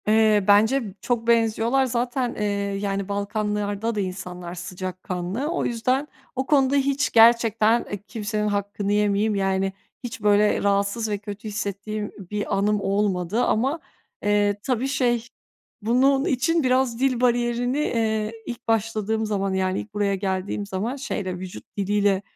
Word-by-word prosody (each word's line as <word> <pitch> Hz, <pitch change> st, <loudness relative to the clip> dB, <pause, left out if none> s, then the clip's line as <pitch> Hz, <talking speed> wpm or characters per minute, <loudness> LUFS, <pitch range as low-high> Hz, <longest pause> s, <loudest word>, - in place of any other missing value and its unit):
Eee, 215 Hz, -1 st, +4 dB
bence 220 Hz, +6 st, +5 dB, 0.2 s
çok 235 Hz, -2 st, -1 dB
benziyorlar. 230 Hz, +3 st, +3 dB
Zaten, 245 Hz, 0 st, -1 dB
eee, 210 Hz, -, -3 dB, 0.4 s
yani 200 Hz, -1 st, -2 dB
Balkanlar'da 210 Hz, +1 st, -2 dB
da -, -, -1 dB
insanlar 180 Hz, -2 st, -5 dB
sıcakkanlı. 185 Hz, -, -4 dB
O 345 Hz, +2 st, -1 dB
yüzden 255 Hz, +5 st, 0 dB, 0.3 s
o 265 Hz, +1 st, -1 dB
konuda 275 Hz, -1 st, +3 dB
hiç 280 Hz, 0 st, +1 dB
gerçekten, 230 Hz, 0 st, +5 dB
eee, 205 Hz, -, -3 dB
kimsenin 210 Hz, -2 st, -2 dB
hakkını 200 Hz, 0 st, -2 dB
yemeyeyim. 205 Hz, +1 st, +2 dB
Yani 195 Hz, 0 st, 0 dB, 0.3 s
hiç 245 Hz, -1 st, -6 dB
böyle 210 Hz, 0 st, +3 dB
rahatsız 200 Hz, +3 st, +1 dB
ve 205 Hz, -, -1 dB
kötü 205 Hz, +1 st, -8 dB
hissettiğim 210 Hz, 0 st, -4 dB, 0.2 s
bir 205 Hz, -1 st, -1 dB
anım 205 Hz, +1 st, +1 dB
olmadı 200 Hz, +1 st, 0 dB
ama, 270 Hz, +9 st, +1 dB, 0.4 s
eee, 205 Hz, 0 st, +2 dB
tabii 255 Hz, 0 st, 0 dB
şey 240 Hz, -4 st, 0 dB, 0.5 s
bunun 265 Hz, +5 st, +3 dB
için 320 Hz, +5 st, +1 dB
biraz 255 Hz, -2 st, +2 dB
dil 260 Hz, -2 st, +1 dB
bariyerini, 245 Hz, +1 st, +1 dB
eee, 220 Hz, -6 st, 0 dB
ilk 240 Hz, 0 st, -7 dB
başladığım 220 Hz, 0 st, 0 dB
zaman 195 Hz, -2 st, -1 dB
yani 190 Hz, 0 st, 0 dB
ilk 210 Hz, -, -9 dB
buraya 205 Hz, -1 st, +1 dB
geldiğim 190 Hz, +1 st, -2 dB
zaman 200 Hz, +6 st, -3 dB
şeyle 200 Hz, -9 st, -4 dB
vücut 185 Hz, 0 st, -8 dB
diliyle 200 Hz, -1 st, +2 dB
210 Hz, 140 wpm, -24 LUFS, 200-240 Hz, 0.5 s, bence